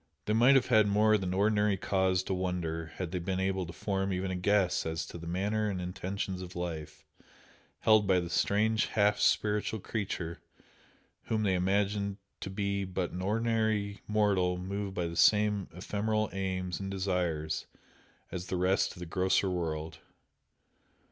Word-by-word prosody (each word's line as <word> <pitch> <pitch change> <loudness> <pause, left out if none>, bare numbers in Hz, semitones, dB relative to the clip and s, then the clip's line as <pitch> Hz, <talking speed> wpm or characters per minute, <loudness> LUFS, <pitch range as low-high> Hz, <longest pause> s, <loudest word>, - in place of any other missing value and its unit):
They 105 - 0
might 120 +5 +6
have 130 - +4
had 110 -4 +4
more 105 +2 +4
than 95 -3 -1
ordinary 105 +1 +2
cause 95 -1 +1
to 95 - -2
"wonder" 90 -3 -2
had 90 -3 -4
they 90 - -2
been 95 +2 -2
able 95 -1 -1
to - - -7
form 95 +2 -2
even 95 0 -2
a - - -2
guess 95 0 +2
as 80 0 -3
to 85 - -9
the 85 - -8
manner 105 +5 0
and 95 -2 -3
intentions 95 +1 -4
of 90 0 -8
life 85 -4 -5 0.8
held 110 -2 +5
by 95 -2 +4
the 85 - -3
strange 110 +2 +2
half 105 -1 +2
spiritual 105 +1 +1
creature 90 -5 -4 0.8
whom 110 -1 0
they 95 -2 +2
imagined 100 +2 0 0.2
to - - -5
be 100 0 -1
but 90 -1 -3
an 90 - -5
ordinary 110 -1 0
mortal 100 -4 +2
moved 100 +1 -4
by 90 - -1
the 85 0 -4
same 105 +1 +4
ephemeral 105 +4 -1
aims 95 -2 -2
and 95 -1 -4
desires 90 -5 -1 0.6
as 90 0 -5
the 90 - -2
rest 90 +2 +2
of - - -13
the - - -4
grosser 95 +2 +1
world. 80 -3 -3
95 Hz, 165 wpm, -31 LUFS, 90-105 Hz, 0.8 s, might